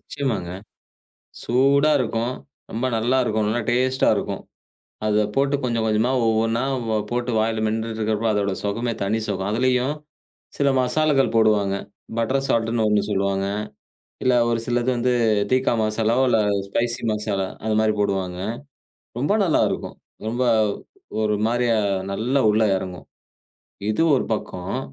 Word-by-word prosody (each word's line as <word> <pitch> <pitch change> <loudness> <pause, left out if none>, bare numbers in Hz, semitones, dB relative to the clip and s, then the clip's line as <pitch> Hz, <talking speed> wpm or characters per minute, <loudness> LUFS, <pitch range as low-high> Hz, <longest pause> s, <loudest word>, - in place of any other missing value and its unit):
நிச்சயமாங்க. 115 -11 -3 0.9
சூடா 140 +5 +3
இருக்கும். 120 0 -1 0.4
ரொம்ப 115 +3 -2
நல்லாயிருக்கும். 115 -2 +1
நல்லா 115 +3 0
டேஸ்ட்டா 130 +2 +2
இருக்கும். - - -3 0.7
அத 105 0 +2
போட்டு 140 +1 +2
கொஞ்சம் 115 -2 0
கொஞ்சமா 110 +3 +2 0.2
ஒவ்வொன்னா 115 +2 +1 0.3
வ 110 - 0 0.2
போட்டு 120 +1 -1
வாயில 110 0 0
மென்னுட்டுருக்கிறப்போ, 110 0 -1
அதோட 100 -1 0
சுகமே 115 +4 -1
தனி 105 +3 0
சுகம்! 95 0 -2
அதிலேயும், 125 +4 +1 0.6
சில 140 - +2
மசாலாக்கள் 135 +1 +2
போடுவாங்க. 105 -3 +3 0.4
பட்டர் 135 +4 0
சால்டுன்னு 115 -1 +1
ஒண்ணு 105 -1 +3
சொல்லுவாங்க. 100 0 0 0.8
இல்ல 130 -1 +3
ஒரு 115 - +1
சிலது 120 +1 +1
வந்து 125 +1 +1 0.4
தீக்கா 130 0 +2
மசாலாவோ 110 +4 +1
இல்ல 120 - +3 0.3
ஸ்பைசி 120 +4 -1
மசாலா 105 -2 -1 0.2
அது 110 -1 0
மாரி 110 0 +3
போடுவாங்க. 95 -3 -1 0.8
ரொம்ப 140 +10 +1
நல்லா 170 - +2
இருக்கும். - - -4 0.3
ரொம்ப, 120 +3 -1 0.8
ஒரு 105 -1 +1
மாரியா 120 0 +1 0.4
நல்லா 125 +7 0
உள்ள 110 +1 +2
எறங்கும். 90 -1 -6 0.8
இது 110 +9 +1
ஒரு - - 0
பக்கம். 90 -3 -4
115 Hz, 130 wpm, -22 LUFS, 105-125 Hz, 0.9 s, சூடா